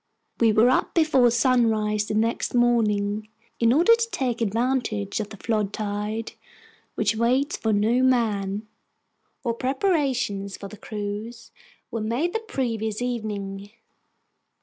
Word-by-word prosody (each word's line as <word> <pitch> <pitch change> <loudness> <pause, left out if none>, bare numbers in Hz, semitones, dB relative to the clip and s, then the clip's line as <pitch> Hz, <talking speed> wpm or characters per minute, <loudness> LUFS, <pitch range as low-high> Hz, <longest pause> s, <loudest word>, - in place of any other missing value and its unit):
We 230 -2 +5
were 220 +4 +5
up - - 0
before 290 -7 +4
sunrise 225 -4 +2
the 215 - -2
next 225 +3 0
morning, 215 -3 +1 0.3
in 230 0 +4
order 340 - +6
to 460 0 -2
take 245 - -2
advantage 225 -2 -1
of 210 -1 -4
the 215 - -10
flood 215 -1 -1
tide, 210 +1 -3 0.6
which 215 +1 +1
waits 250 +5 +1
for 220 - -1
no 220 +4 +2
man. 215 -5 +1 0.8
Our 235 - +1
preparations 260 - -1
for 200 - -8
the 215 - -11
cruise 210 +3 -6 0.4
were 230 - -3
made 245 +11 -1
the 450 - 0
previous 230 - -3
evening. 205 -5 -4
225 Hz, 130 wpm, -24 LUFS, 210-250 Hz, 0.8 s, order